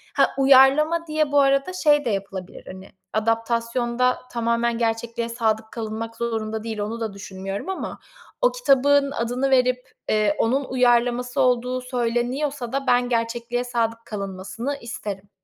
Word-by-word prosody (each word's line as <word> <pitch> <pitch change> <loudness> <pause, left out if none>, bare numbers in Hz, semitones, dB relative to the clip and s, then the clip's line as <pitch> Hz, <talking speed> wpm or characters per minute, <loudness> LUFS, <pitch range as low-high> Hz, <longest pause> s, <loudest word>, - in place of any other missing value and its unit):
Ha, 275 -1 +4
uyarlama 275 +5 +5
diye 305 -1 0
bu 290 - +4
arada 275 +5 +2
şey 295 -5 +3
de - - +1
yapılabilir, 195 -3 -5
hani, 190 +1 -10 0.2
adaptasyonda 235 +2 0
tamamen 235 0 0
gerçekliğe 230 0 -2
sadık 220 -2 -1
kalınmak 225 0 -5
zorunda 220 -2 -3
değil, 225 -2 -5
onu 215 +3 -3
da 220 -3 -3
düşünmüyorum 195 - -6
ama 380 - -5 0.4
o - - +4
kitabın 285 - +3
adını 250 +1 -1
verip, 250 -1 +2 0.2
eee, 210 -1 +2
onun 270 +5 +1
uyarlaması 245 -1 +2
olduğu 250 0 +1
söyleniyorsa 250 +2 -2
da 275 0 -2
ben 245 0 +3
gerçekliğe 235 +1 -1
sadık 230 -2 -2
kalınmasını 200 +7 -5
isterim. 205 -4 -6
240 Hz, 135 wpm, -23 LUFS, 225-265 Hz, 0.4 s, uyarlama